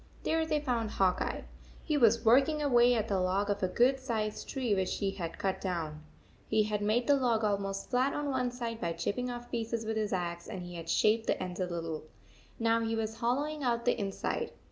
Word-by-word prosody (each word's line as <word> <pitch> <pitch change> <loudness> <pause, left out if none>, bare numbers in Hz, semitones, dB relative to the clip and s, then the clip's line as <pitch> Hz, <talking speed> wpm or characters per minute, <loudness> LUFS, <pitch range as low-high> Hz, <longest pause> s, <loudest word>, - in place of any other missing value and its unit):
There 320 0 +1
they 305 -1 +1
found 240 -6 -1
Hawk 190 -3 +2
Eye. - - -2 0.4
He 305 - 0
was 230 -3 +4
working 275 +7 +5
away 245 -4 +5
at 220 -1 0
the 195 -3 +1
log 195 +3 +1
of 200 - -2
a 185 - +2
good 250 +8 +3
sized 220 -5 -3
tree 255 -6 0
which 190 -2 0
he 195 -2 0
had 170 -4 -5
cut 190 -1 -1
down. 160 -5 -3 0.5
He 215 0 +3
had 210 -1 -2
made 220 +4 +2
the 285 - +5
log 240 -5 +1
almost 200 -1 -1
flat 255 +2 +3
on 295 -1 -1
one 255 -2 0
side 235 -2 -5
by 170 -1 -1
chipping 225 +9 -2
off 240 0 -7
pieces 230 -1 -2
with 220 0 -2
his 215 -1 -1
axe, 175 -2 -3
and 185 - -6
he 175 0 -8
had 165 -1 -7
shaped 215 +6 +3
the - - +1
ends 180 0 -5
a 185 - 0
little. 165 -3 -4 0.6
Now 230 0 +2
he 225 0 -1
was 220 0 -3
hollowing 290 +6 -1
out 235 -3 0
the 245 - +3
inside. 195 -2 -2
225 Hz, 220 wpm, -31 LUFS, 195-245 Hz, 0.6 s, working